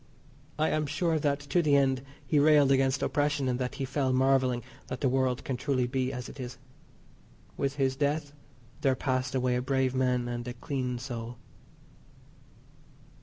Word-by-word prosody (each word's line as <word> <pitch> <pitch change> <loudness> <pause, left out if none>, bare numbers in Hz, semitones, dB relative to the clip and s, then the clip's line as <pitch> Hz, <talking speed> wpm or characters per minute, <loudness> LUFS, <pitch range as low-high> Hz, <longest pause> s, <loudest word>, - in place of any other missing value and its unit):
I 155 +1 +2
am 155 -1 0
sure 160 +2 0
that 145 -1 0
to 145 +5 +1
the 150 -3 +3
end 135 -2 +3 0.2
he 150 - +2
railed 145 -2 +5
against 135 -1 +2
oppression, 145 -2 +1
and 125 0 0
that 125 -1 -2
he 135 - -2
fell 135 0 0
marvelling 130 -2 +2 0.2
that 130 - -5
the 135 - +3
world 130 -1 +1
can 130 - -3
truly 130 -2 0
be 130 +1 -1
as 125 -2 -5
it - - -11
is. 125 0 -6 1.0
With 140 0 -1
his 135 -2 +1
death 145 0 -1 0.5
there 135 -3 +3
passed 130 0 -1
away 125 -1 +1
a 125 - 0
brave 130 0 +1
man 125 -2 +1
and 120 0 -4
a 120 - -4
clean 130 -3 -3
soul. 120 -2 -6
130 Hz, 170 wpm, -29 LUFS, 125-140 Hz, 1.0 s, railed